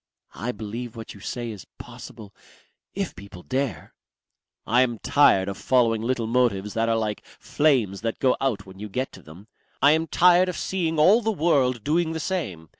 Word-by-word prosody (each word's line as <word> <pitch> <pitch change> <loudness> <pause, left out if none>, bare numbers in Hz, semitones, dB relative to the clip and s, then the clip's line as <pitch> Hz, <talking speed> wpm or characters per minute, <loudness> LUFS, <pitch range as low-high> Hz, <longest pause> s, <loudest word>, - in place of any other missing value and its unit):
"I 115 +6 -4
believe 115 +2 -7
what 115 -1 -8
you 100 - -14
say 120 +3 -5
is 105 -3 -11
possible. 110 -3 -11 0.6
If - - -3
people 90 -1 -12
dare." 135 -1 -3 0.7
"I 120 +3 +3
am 120 -3 0
tired 100 -8 +3
of 100 -1 -5
following 115 -4 +2
little 120 0 -1
motives 110 -4 0
that 115 0 0
are 115 - +2
like 110 -2 -3
flames 125 -11 0
that 115 0 -3
go 130 -2 +2
out 115 -8 -1
when 95 0 -14
you 105 +1 -7
get 130 +6 -3
to - - -13
them. 85 +7 -14 0.3
I 145 - +6
am 160 +1 +1
tired 180 +2 +4
of 180 - -4
seeing 165 -4 -2
all 190 +10 +5
the 225 0 0
world 140 - +1
doing 160 +2 0
the 160 - -3
same. 145 - -4
120 Hz, 190 wpm, -24 LUFS, 105-150 Hz, 0.7 s, I